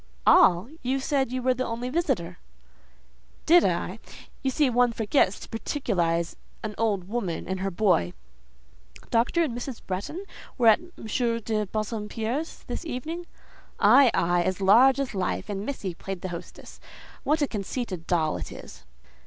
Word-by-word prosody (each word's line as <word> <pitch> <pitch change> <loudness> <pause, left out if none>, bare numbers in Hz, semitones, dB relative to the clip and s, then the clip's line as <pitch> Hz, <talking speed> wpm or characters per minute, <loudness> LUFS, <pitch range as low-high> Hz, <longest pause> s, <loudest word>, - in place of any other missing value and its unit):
"All! 190 - +6
You 260 +2 0
said 270 -2 0
you 255 -1 -3
were 255 0 +3
the 255 +1 -2
only 230 +2 -3
visitor." 270 - -1 1.1
"Did 345 +2 +7
I? - - -1 0.4
You 270 - 0
see 285 +2 +2
one 245 -1 +3
forgets 215 -2 +2
to - - -8
particularize 175 - -1 0.3
an 215 -1 -3
old 200 -5 0
woman 195 -6 -3
and 190 0 -2
her 195 +1 -1
boy." 175 - +2 1.0
"Dr. 240 +9 +2
and 265 -8 -2
Mrs. 245 0 -5
Bretton 205 - -4 0.3
were 235 -3 +6
at 220 - +6
M. 350 +1 -15 0.5
de 215 -1 -1
Bassompierre's 220 - -3
this - - -5
evening?" 325 +4 -5 0.5
"Ay, 250 +6 +7
ay! 175 +1 +2
as 185 +2 -1
large 240 +8 +6
as 275 -4 -2
life; 190 +2 -2
and 200 -1 -3
missy 205 -10 -3
played 190 +1 -6
the 185 - -4
hostess. 170 -1 -9 0.4
What 300 +1 +2
a - - +2
conceited 200 -4 -4
doll 160 -3 +1
it - - -7
is!" - - -11
225 Hz, 155 wpm, -26 LUFS, 190-265 Hz, 1.1 s, Did